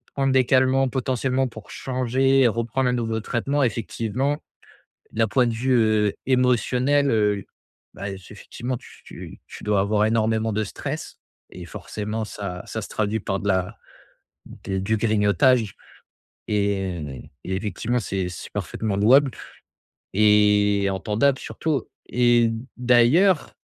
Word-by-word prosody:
prendre 135 -1 +1
des 130 -1 +4
calmants 130 +1 +3
potentiellement 130 0 0
pour 110 -3 -12
changer, 130 +1 +2
reprendre 115 +3 0
un 125 - 0
nouveau 115 -2 -2
traitement 135 +6 -1
effectivement, 125 +4 -2 0.7
d'un 110 0 +1
point 125 +4 +2
de 115 - -1
vue, 130 +4 0
heu, 110 -3 +3
émotionnel 130 +2 +2
heu, 105 -3 +1 0.5
bah, 100 - -6
c'est 95 - -14
effectivement 125 +2 -5
tu - - -14
tu - - -11
tu - - -11
dois 105 -1 +1
avoir 105 +1 +2
énormément 110 0 +1
de 110 +1 0
stress 100 - -6 0.3
et 90 - -9
forcément 105 +5 -5
ça 100 -4 -6
ça 110 - -5
se - - -7
traduit 110 +1 -1
par 95 -1 -2
de - - -6
la 95 -2 0 0.7
d 95 -1 -5
du 110 +4 0
grignotage 105 +1 +2 0.7
et 95 - -2
et 95 0 -2
effectivement 110 +4 -2
c'est 95 -4 -3
c'est 90 - -8
parfaitement 110 -3 -3
louable 130 +7 +5 0.8
et 105 -1 +4
entendable 110 +8 +1
surtout 150 -3 -3 0.2
et 120 -1 +3 0.3
d'ailleurs 125 +9 +3
115 Hz, 135 wpm, -23 LUFS, 105-130 Hz, 0.8 s, louable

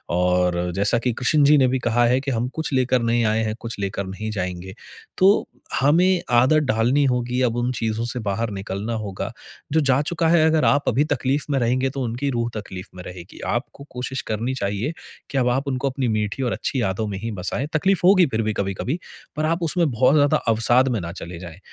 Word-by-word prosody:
और 90 0 +1
जैसा 100 +4 +2
कि 120 +1 -1
कृष्ण 135 +5 +2
जी 150 +1 +6
ने 130 -2 +4
भी 130 +1 0
कहा 120 0 +2
है 125 +2 +3
कि 135 0 -3
हम 120 0 -1
कुछ 160 -1 -3
लेकर 130 -1 +2
नहीं 115 0 +1
आए 110 +1 +1
हैं, 110 -1 -2
कुछ 115 -2 -7
लेकर 100 0 -3
नहीं 105 +3 -5
जाएँगे। 90 -2 -4 0.4
तो 195 +3 +4 0.3
हमें 175 +6 +3 0.2
आदत 135 +5 +4
डालनी 120 +6 +2
होगी, 125 -1 0
अब 120 -2 +1
उन 120 +1 0
चीज़ों 115 -1 -2
से 120 +1 -4
बाहर 110 +1 -2
निकलना 100 +3 -4
होगा। 95 -2 -5 0.4
जो 160 - +4
जा 135 -2 +3
चुका 165 +2 -1
है, 165 -1 +5
अगर 160 -1 +2
आप 145 0 +3
अभी 130 +4 +2
तकलीफ़ 135 +1 -1
में 135 - +2
रहेंगे, 130 +2 +1
तो 135 0 -5
उनकी 125 +4 -2
रूह 120 -2 -1
तकलीफ़ 95 -1 -9
में 90 - -8
रहेगी। 90 +1 -10 0.2
आपको 130 +3 -5
कोशिश 125 +1 -4
करनी 115 +4 -1
चाहिए 105 +6 -2 0.4
कि 140 - -3
अब 125 -2 +2
आप 135 +3 -1
उनको 135 0 -1
अपनी 130 -1 -2
मीठी 110 +3 -1
और 120 - 0
अच्छी - - -3
यादों 100 +2 -1
में 100 -2 -4
ही 115 +3 -4
बसाएँ। 100 +8 -3
तकलीफ़ 190 +4 +2
होगी 185 -1 +6
फिर 115 -4 -1
भी 110 -1 -1
कभी-कभी, 100 - -2 0.4
पर 155 0 -1
आप 165 +2 0
उसमें 165 0 +2
बहुत 125 +3 +3
ज़्यादा 145 -1 +4
अवसाद 120 +3 +3
में 120 -3 0
ना 85 0 -5
चले 85 -2 -8
जाएँ। 85 -1 -10
120 Hz, 220 wpm, -22 LUFS, 105-140 Hz, 0.4 s, जी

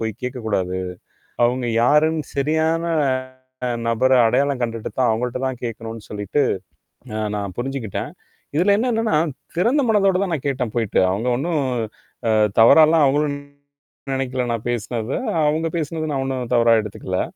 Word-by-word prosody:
போய்க் 110 -1 -4
கேட்கக் 125 -2 -5
கூடாது. 95 -3 -1 0.7
அவுங்க 125 +1 0 0.2
யாருன்னு 150 +4 +3
சரியான 160 +3 +1 1.0
நபர 120 +3 +2
அடையாளம் 135 +3 +1
கண்டுட்டு 115 -2 -3
தான், 130 - +3
அவுங்கள்ட்ட 120 +3 -2
தான் 130 -2 -3
கேட்கணுன்னு 115 -1 -6
சொல்லிட்டு, 105 +7 -1 0.7
அ - - -3 0.2
நான் 100 -3 -4
புரிஞ்சுக்கிட்டேன்." 125 -5 -4 0.5
இதுல 185 +5 +4
என்னன்னா 225 -5 +1 0.4
திறந்த 245 - +3
மனதோட 195 -3 +3
தான் 185 -4 -2
நான் 145 - -7
கேட்டேன் 125 -5 -2
போயிட்டு. 115 -4 +1
அவுங்க 105 +6 -2
ஒன்னும் 155 +1 -1 0.7
அ - - +4 0.3
தவறால்லாம் 155 +6 +7
அவுங்களும் 145 +1 +1 0.8
நெனைக்கல 130 -1 -1
நான் 115 +1 -4
பேசுனத. 115 0 -3 0.4
அவுங்க 160 +2 +1
பேசுனது 155 0 -3
நான் 135 -1 -1
ஒன்னும் 130 -2 -3
தவறா 115 -1 +5
எடுத்துக்கல. 95 -3 -3
130 Hz, 135 wpm, -21 LUFS, 115-155 Hz, 1.0 s, தவறால்லாம்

